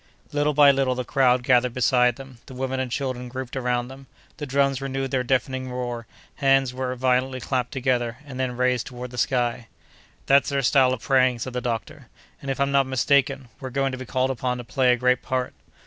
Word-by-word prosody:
Little 145 0 0
by 145 -1 +7
little 135 -2 0
the 125 - -3
crowd 130 -3 +2
gathered 125 -1 +2
beside 125 -1 +3
them, 135 -2 -12
the 130 - -10
women 130 +1 -2
and 130 -2 -3
children 125 -2 -3
grouped 130 0 -6
around 125 -2 -1
them, 135 +1 -12 0.3
the 145 - -5
drums 135 0 +1
renewed 135 -1 -3
their 130 -2 +1
deafening 130 0 -1
uproar, 120 -2 -5 0.3
hands 135 -2 +3
were 130 0 -3
violently 130 +1 0
clapped 125 -1 -2
together, 125 -3 -1
and 130 -3 -8
then 125 -2 -2
raised 125 -1 +1
toward 125 0 -8
the 125 - -5
sky. 120 -1 0 0.6
"That's 140 +2 +4
their 140 -1 -1
style 130 0 +4
of 125 - -6
praying," 130 -2 +3
said 125 +2 -5
the 125 - -2
doctor; 115 -3 -4 0.3
"and, 140 - -6
if 135 - -2
I'm 140 0 +1
not 140 -1 +3
mistaken, 135 0 +1
we're 130 - -6
going 135 +1 0
to 130 - -5
be 130 - -8
called 130 +1 0
upon 125 0 -2
to 120 - -6
play 125 +1 +2
a - - +4
great 125 +1 +2
part." 130 -1 -2
130 Hz, 210 wpm, -24 LUFS, 125-135 Hz, 0.6 s, by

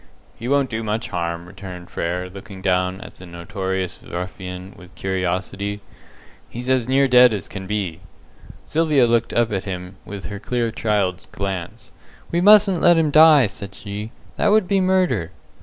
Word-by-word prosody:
"He 115 - -7
won't 140 -1 +1
do 110 0 -2
much 110 +2 -2
harm," 85 -1 -3
returned 90 -1 -10
Frere, 90 +2 -2
looking 100 +1 -10
down 90 0 0
at - - -11
the 90 - -12
notorious 95 +1 -4
ruffian 90 +1 -7
with 90 -2 -16
curiosity. 95 +2 -2 0.7
"He's 125 +2 -4
as 125 -3 +1
near 135 +1 +3
dead 125 -3 +6
as 100 -1 -6
can 95 -1 -8
be." 95 -6 -3 0.7
Sylvia 150 -4 +3
looked 115 0 +1
up 120 -2 +1
at 95 -2 -2
him 90 0 -6
with 100 -1 -8
her 100 -1 -6
clear 120 +1 -1
child's 100 -5 -1
glance. 95 -3 -5 0.4
"We 170 - +1
mustn't 200 -2 +6
let 175 -1 +6
him 155 -2 +2
die," 155 -3 +7
said 100 0 -7
she. 105 +1 -6 0.3
"That - - +2
would 210 -2 +4
be 195 +1 +2
murder." 180 - +1
100 Hz, 165 wpm, -21 LUFS, 90-125 Hz, 0.7 s, die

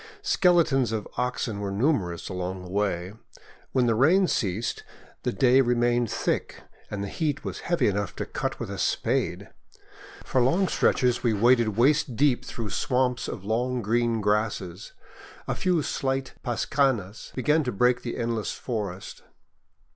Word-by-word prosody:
Skeletons 170 - +3
of 110 -2 -3
oxen 125 -4 -2
were 100 -1 -3
numerous 100 - 0
along 90 0 -4
the 90 - -10
way. 95 -2 -1 0.6
When 130 -2 +2
the 115 - +3
rain 165 - +4
ceased, 105 - -1 0.4
the - - -1
day 130 +5 +4
remained 120 -1 +2
thick, - - -2 0.3
and 100 -1 -4
the - - -3
heat 150 - -2
was - - -4
heavy 175 - +2
enough 100 -2 -1
to - - -3
cut - - -4
with - - -5
a - - -5
spade. - - -1 0.8
For 130 - +1
long 170 +10 +3
stretches 125 -7 +2
we 115 -3 +2
waded 115 0 +3
waist 140 +1 +3
deep 140 0 +2
through 115 -3 -5
swamps 125 -1 0
of 95 - -6
long 120 +3 -1
green 115 +1 +1
grasses. 105 -3 -1 0.5
A - - 0
few 180 -4 +1
slight 135 -1 -2
pascanas 120 -4 -1
began 150 +4 +2
to 125 - -2
break 125 +3 +2
the 120 - -5
endless 115 -2 -2
forest. 100 -6 -5
120 Hz, 150 wpm, -26 LUFS, 105-130 Hz, 0.8 s, rain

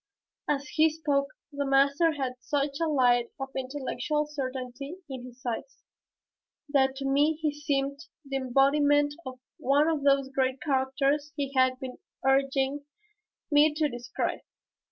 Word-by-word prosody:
As 285 0 0
he 315 +1 +4
spoke 290 -3 0 0.2
the 285 -1 -2
master 280 +4 +3
had 265 -3 -2
such 280 +1 -1
a 330 - +2
light 245 -5 +3
of 270 0 -4
intellectual 285 +3 -2
certainty 270 0 -5
in 260 -3 -7
his 255 +1 -14
eyes 250 +3 -5 0.9
that 265 -2 +3
to 275 0 -5
me 290 +3 +3
he 305 -1 -1
seemed 280 0 -2 0.2
the 275 0 -2
embodiment 285 +3 +3
of 255 -1 -7 0.2
one 285 +4 +3
of 320 -3 0
those 275 -1 +3
great 265 -1 0
characters 275 +2 0
he 275 -1 -3
had 255 0 +3
been 260 -2 -7 0.3
urging 270 +1 +2 0.7
me 295 +1 +5
to 305 0 +2
describe. 240 -1 -3
275 Hz, 140 wpm, -28 LUFS, 265-290 Hz, 0.9 s, me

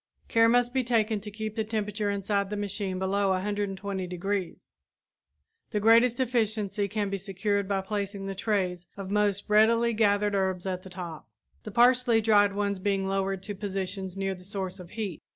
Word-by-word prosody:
Care 230 -1 +4
must 245 +1 +3
be 260 -1 +1
taken 225 -3 +1
to 210 +1 -8
keep 215 +1 -5
the 220 - 0
temperature 210 -1 -2
inside 200 0 -1
the 210 - -3
machine 200 -2 -3
below 195 +1 +1
120 195 0 -2
degrees. 185 +1 -4 1.0
The 210 - -1
greatest 230 +3 +5
efficiency 220 -5 0
can 205 -1 -2
be 195 - -2
secured 200 +1 -1
by 195 -1 0
placing 200 0 -4
the 195 - -3
trays 185 -4 -1
of 195 -1 -6
most 205 -1 +1
recently 230 +2 +4
gathered 205 -1 +2
herbs 190 -2 0
at 185 -1 -2
the 190 - -11
top, 170 -8 -8 0.3
the - - -8
partially 245 0 +4
dried 205 -2 +4
ones 200 -1 -1
being 195 0 0
lowered 195 0 -1
to 205 - -5
positions 195 -1 -4
nearer 195 0 -1
the 180 -1 -12
source 190 -1 -4
of 180 -2 -10
heat. 205 -6 -5
200 Hz, 175 wpm, -28 LUFS, 190-215 Hz, 1.0 s, greatest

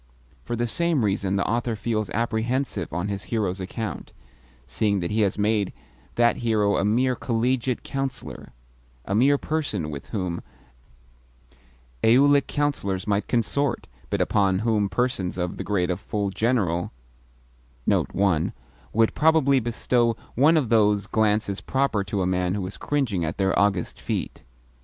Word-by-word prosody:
For - - -2
the 120 +1 0
same 160 0 +1
reason 100 -1 0
the 100 - 0
author 120 0 0
feels 110 -1 -2
apprehensive 115 +4 -1
on 85 +4 -2
his 100 -1 -4
hero's 100 -5 -1
account, 105 +4 -5 0.5
seeing 100 - 0
that 85 -1 -3
he 110 +1 +1
has 100 -2 +1
made 105 -1 +1 0.4
that 120 0 +3
hero 110 -4 +1
a - - +1
mere 125 +5 +2
Collegiate 125 +1 -1
Councillor 135 -1 -5 0.6
a 100 - -2
mere 135 +7 +4
person 135 - -2
with 70 -1 -7
whom 90 -5 -3 1.6
Aulic 140 +4 +5
Councillors 100 -11 -1
might 100 -1 0
consort, 125 +3 0 0.2
but 100 -2 0
upon 95 0 +2
whom 105 -3 +2
persons 95 -4 -1
of 90 -1 -3
the - - -4
grade 95 -3 0
of 90 - -2
full 100 -1 -2
General 95 -7 0 0.9
would 80 - 0
probably 150 -4 +4
bestow 120 0 +1 0.2
one 150 +6 +4
of 135 -7 0
those 105 -3 +3
glances 105 -2 +1
proper 130 -7 0
to 95 0 -1
a - - 0
man 90 0 0
who 100 -3 -2
is 95 - -6
cringing 125 -12 -1
at 80 +3 -3
their 95 -1 +1
august 100 -4 0
feet. - - -3
105 Hz, 145 wpm, -24 LUFS, 95-120 Hz, 1.6 s, Aulic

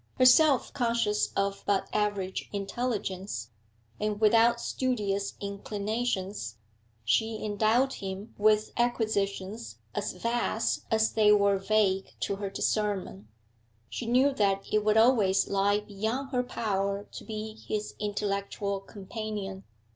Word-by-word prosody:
Herself 260 +2 +5
conscious 230 -4 +1
of 195 0 0
but 200 -1 +1
average 205 -3 -1
intelligence, 195 - -3 0.5
and 210 -1 -1
without 230 +2 +5
studious 210 -6 -1
inclinations, 200 - -3 0.5
she 220 - +2
endowed 220 +6 +2
him 195 +3 -6
with 215 0 +3
acquisitions 200 - -1 0.2
as - - -2
vast 230 +3 -1
as 220 0 +3
they 215 -1 +5
were 200 -1 +4
vague 195 -1 +1
to 200 - -1
her 200 -1 -3
discernment; 195 - -1 0.6
she 235 - -4
knew 260 +4 +4
that 195 -4 +1
it 215 0 +3
would 215 +1 +3
always 220 -5 +4
lie 200 +1 +2
beyond 220 +6 -3
her 250 -2 +2
power 200 -4 -2
to - - -8
be 215 0 -6
his 210 -1 -2
intellectual 200 -1 -2
companion. 200 -1 -6
210 Hz, 115 wpm, -29 LUFS, 195-225 Hz, 0.6 s, Herself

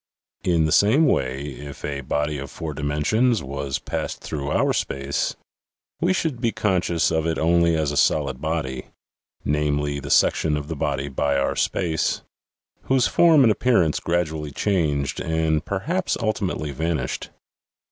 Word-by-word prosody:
In 85 -3 +2
the 80 - 0
same 120 - +5
way, 65 - 0
if 70 0 -8
a 70 -1 -3
body 75 +2 -1
of 70 0 -6
four 80 -2 -6
dimensions 75 - +1
was 70 0 -3
passed - - -4
through 70 -2 -4
our - - +2
space, 70 +1 -2 0.6
we 175 +3 +2
should 160 -9 -1
be 115 -2 +1
conscious 90 -6 +1
of 80 0 0
it 80 - 0
only 85 0 +3
as 75 -2 0
a - - -4
solid 70 -4 +2
body 75 -5 -3 0.6
(namely, 75 -1 0
the 70 0 -7
section 75 +1 +3
of 75 0 -6
the 80 - -3
body 70 -1 -2
by 70 0 0
our 70 - 0
space) 80 -3 0 0.6
whose 130 -3 +3
form 160 -5 +5
and 115 - +5
appearance 105 -9 +2
gradually 80 -3 -1
changed 75 -5 0
and 80 -1 0
perhaps 165 - -1
ul 110 -2 +1
timately 80 -8 -3
vanished. 80 -3 -2
80 Hz, 155 wpm, -23 LUFS, 70-90 Hz, 0.6 s, same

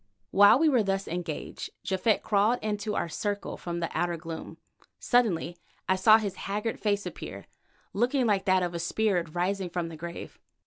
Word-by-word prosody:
While 205 +4 +7
we 320 +3 +3
were 260 -6 +4
thus 195 -1 -1
engaged, 170 -2 -5 0.2
Japhet 195 +3 +1
crawled 215 +3 +3
into 210 0 -2
our - - -1
circle 205 +4 -3
from 170 -1 -5
the 165 - -1
outer 175 -1 0
gloom. 165 0 -8 0.4
Suddenly 185 -8 +1 0.3
I 190 - +3
saw 215 +4 +7
his 205 -4 -4
haggard 210 +3 -2
face 205 -1 0
appear, - - -7 0.5
looking 245 +5 +1
like 200 -3 +1
that 185 -2 +3
of 175 -1 -2
a 170 - -3
spirit 175 -2 0
rising 185 +1 -1
from 170 -1 -3
the 165 - -8
grave. 170 +2 -8
195 Hz, 175 wpm, -28 LUFS, 175-215 Hz, 0.5 s, While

